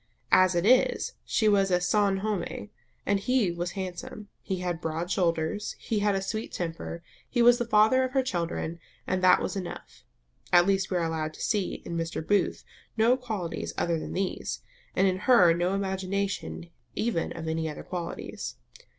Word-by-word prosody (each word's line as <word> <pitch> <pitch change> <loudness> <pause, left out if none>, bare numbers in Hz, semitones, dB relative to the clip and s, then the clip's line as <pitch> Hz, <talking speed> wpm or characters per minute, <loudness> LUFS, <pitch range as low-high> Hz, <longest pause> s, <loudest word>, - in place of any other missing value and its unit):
As 185 -1 +5
it 170 +2 +1
is, 250 +3 +3
he 220 - +1
was 195 -2 +3 0.2
son 200 -1 +3
homme; 210 0 -3 0.4
he 205 +1 +2
was 175 +1 -3
handsome; 190 +2 -6
he 190 - -3
had 175 -2 -2
broad 165 +3 -3
shoulders; 170 +3 0
he 220 - -2
had 205 -1 +2
a 195 - -1
sweet 215 +3 -4
temper; 170 0 -5 0.3
he 240 -2 +2
was 240 +1 +6
the 240 - 0
father 220 +4 +5
of 255 0 -3
her 265 -1 +3
children, 170 -5 -3 0.3
and 185 0 -1
that 185 - +7
was - - -3
enough. 185 -3 -7 0.5
At 175 -1 +7
least 195 0 +1
we 185 - 0
are 170 - 0
allowed 155 -1 -2
to - - -10
see 205 -4 -1
in 170 - -4
Mr. 165 -1 -3
Booth 205 -2 +1 0.3
no 230 +3 +5
qualities 215 -10 -4
other 170 -1 +1
than - - -6
these, 190 -1 -3 0.3
and 190 - +4
in 185 -1 +1
her 180 -9 +7
no 175 +3 0
imagination 190 -2 -3 0.2
even 220 -7 -1
of 165 -1 -6
any 160 0 -1
other 150 - -7
qualities. 175 -2 -5
190 Hz, 175 wpm, -28 LUFS, 170-210 Hz, 0.5 s, that